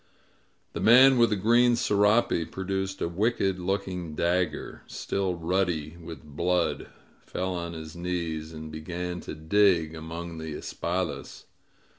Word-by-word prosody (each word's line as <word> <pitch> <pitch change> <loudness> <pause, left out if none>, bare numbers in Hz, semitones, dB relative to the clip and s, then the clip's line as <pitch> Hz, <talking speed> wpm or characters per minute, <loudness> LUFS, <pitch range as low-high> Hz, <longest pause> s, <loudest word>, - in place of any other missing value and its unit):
The - - -4
man 130 +3 +7
with 115 -1 +5
the 105 - +1
green 120 +4 +4
serape 105 -6 +2
produced 95 0 -3
a - - +1
wicked 95 +1 0
looking 90 -3 -3
dagger, 85 -1 -1
still 95 -2 -2
ruddy 85 -2 -1
with 85 -3 -10
blood, 85 +4 -1 0.4
fell 95 0 -3
on 85 -1 -4
his 80 -1 -8
knees, 85 -3 -3
and 80 -1 -8
began 90 +3 -4
to - - -7
dig 80 0 +3
among 80 +1 -6
the 80 -1 -5
espadas. 90 +4 -4
90 Hz, 130 wpm, -27 LUFS, 80-95 Hz, 0.4 s, man